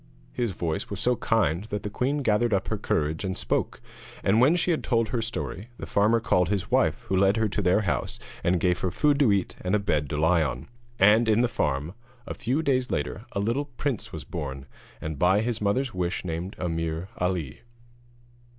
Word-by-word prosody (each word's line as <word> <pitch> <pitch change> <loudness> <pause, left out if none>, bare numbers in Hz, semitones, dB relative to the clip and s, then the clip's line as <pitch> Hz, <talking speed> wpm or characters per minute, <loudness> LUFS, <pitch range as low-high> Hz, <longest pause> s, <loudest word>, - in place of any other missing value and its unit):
His 120 -2 -1
voice 85 -4 -3
was 100 - -4
so 125 +3 +2
kind 100 -6 +1
that 105 -2 -4
the 105 - -3
queen 140 +6 -1
gathered 110 -1 +2
up 95 - -2
her - - -1
courage 80 +2 -1
and 95 -1 -2
spoke. - - -1 0.4
And 110 +4 +4
when 145 +7 +5
she 175 0 +1
had 160 - 0
told 115 -3 +1
her 120 0 -1
story, 115 -1 -4
the - - -6
farmer 110 +3 +3
called 90 -5 +2
his 100 -2 -2
wife, - - +2
who 95 - -2
led 100 +3 +4
her 110 -1 +2
to 105 - -1
their 90 +3 +3
house, 95 - -2 0.2
and 90 0 +2
gave 90 0 +1
her 95 - 0
food 145 - +2
to 135 -7 +5
eat, 100 -2 0
and 90 +3 +1
a - - +3
bed 75 -8 0
to 75 - -2
lie 80 +2 +3
on. 65 -5 -3 0.3
And 110 +2 +5
in 110 +2 +4
the 125 - +3
farm, 75 -7 -1 0.3
a - - -5
few 135 +7 -1
days 130 -3 +1
later, 75 - -3
a - - -1
little 115 +8 0
prince 135 -3 -4
was - - -6
born, 70 -2 -5 0.3
and 80 -2 -5
by 95 +4 +4
his 115 -1 -2
mother's 120 +5 0
wish 90 0 -2
named 85 +3 -4
Ameer 80 0 -2
Ali. 90 -7 -2
100 Hz, 210 wpm, -26 LUFS, 85-115 Hz, 0.4 s, when